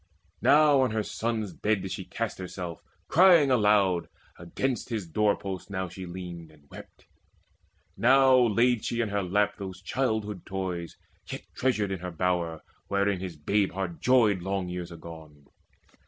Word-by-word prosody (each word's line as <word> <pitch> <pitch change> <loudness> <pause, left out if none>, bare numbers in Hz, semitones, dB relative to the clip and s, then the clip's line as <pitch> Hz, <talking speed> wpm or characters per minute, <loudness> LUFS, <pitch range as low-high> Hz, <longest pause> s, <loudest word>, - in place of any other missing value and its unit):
Now 145 -2 +5
on 130 - +2
her 110 0 -1
son's 110 -3 -3
bed 105 0 0
did 95 - -5
she 95 - -5
cast 115 -4 -4
herself, 90 -2 -6 0.3
Crying 170 -5 +6
aloud, 105 -6 +3 0.3
against 120 +11 -3
his 110 -5 -3
door 105 +5 +1
post 95 -1 -6
now 95 -2 -3
She 95 +1 -8
leaned, 85 -2 -8
and 75 -2 -22
wept: - - -13 0.9
now 130 +2 +5
laid 120 -1 +3
she 120 0 -1
in 115 - -1
her 100 0 0
lap 105 +3 0
Those 95 -2 -7
childhood's 105 -2 -2
toys 90 -3 -4 0.3
yet - - -6
treasured 105 -6 0
in 95 - -3
her 90 +1 -5
bower, 85 -2 -1 0.2
Wherein 100 -1 +1
his 90 -3 -6
babe 100 +6 0
heart 95 -3 -4
joyed 115 -7 +4
long 95 0 -2
years 90 -1 -5
agone. 80 -3 -11
95 Hz, 155 wpm, -27 LUFS, 90-110 Hz, 0.9 s, Crying